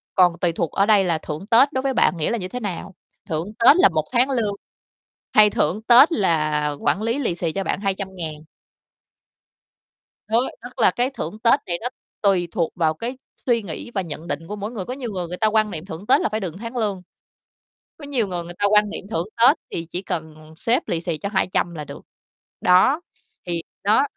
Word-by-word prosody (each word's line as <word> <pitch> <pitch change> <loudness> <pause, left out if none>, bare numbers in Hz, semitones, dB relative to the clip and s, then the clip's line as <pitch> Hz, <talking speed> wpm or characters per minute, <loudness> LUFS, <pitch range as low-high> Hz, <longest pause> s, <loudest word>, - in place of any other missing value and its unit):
còn 175 -2 +4
tùy 175 -2 +1
thuộc 165 -1 -2
ở 200 - +2
đây 205 -3 +5
là 170 -3 +1
thưởng 155 +4 -6
Tết 250 +6 +5
đối 260 - 0
với 270 0 0
bạn 180 - +3
nghĩa 155 - 0
là 235 - 0
như 185 - -4
thế 250 +6 -5
nào? 190 -2 -5 0.3
Thưởng 165 +7 -3
Tết 270 +8 +7
là 365 - +6
1 155 -2 0
tháng 250 +2 +3
lương, 225 -6 0 0.8
hay 210 -1 +7
thưởng 190 +4 0
Tết 250 +7 +8
là 155 - +1
quản 200 - 0
lý 230 +5 0
lì 205 -11 0
xì 170 -2 -2
cho 195 +2 -2
bạn - - -2
200.000. 190 -6 -4 1.8
Đó. 230 +4 +2
Tức 250 +1 -10
là - - +5
cái 245 +2 0
thưởng 215 - -6
Tết 235 +5 +4
này 170 -1 -1
nó 245 - -2 0.3
tùy 190 -4 +2
thuộc 170 -6 -1
vào 160 -3 +1
cái 240 +10 -5 0.3
suy 235 -2 +2
nghĩ 195 +6 -6
và 195 - 0
nhận 165 0 -7
định 165 +1 -4
của 210 - -5
mỗi 205 +2 -5
người, 200 -6 -5
có 250 - -4
nhiều 255 -4 -5
người 180 -3 -4
người 180 +1 -6
ta 220 - +2
quan 215 -1 +2
niệm 160 +2 -6
thưởng 185 +1 -8
Tết - - +5
là - - 0
phải 215 +1 -2
được 185 -6 -4
tháng 230 +2 -6
lương. 205 -5 -1 1.0
Có 290 - -9
nhiều 250 -7 0
người 175 -2 -4
người 175 +1 -9
ta 205 - +2
quan 210 0 +4
niệm 200 - -6
thưởng 170 -1 -2
Tết 250 +7 +6
thì 165 - -4
chỉ 180 +2 -4
cần 155 -3 -6
sếp 235 +8 0
lì 165 -1 -1
xì 170 -3 -3
cho 200 - -4
200 185 -3 0
là 150 - -5
được. - - -10 0.6
Đó, 260 - +4 0.4
thì 170 -1 -2 0.2
đó 215 +6 +4
195 Hz, 220 wpm, -22 LUFS, 170-230 Hz, 1.8 s, Tết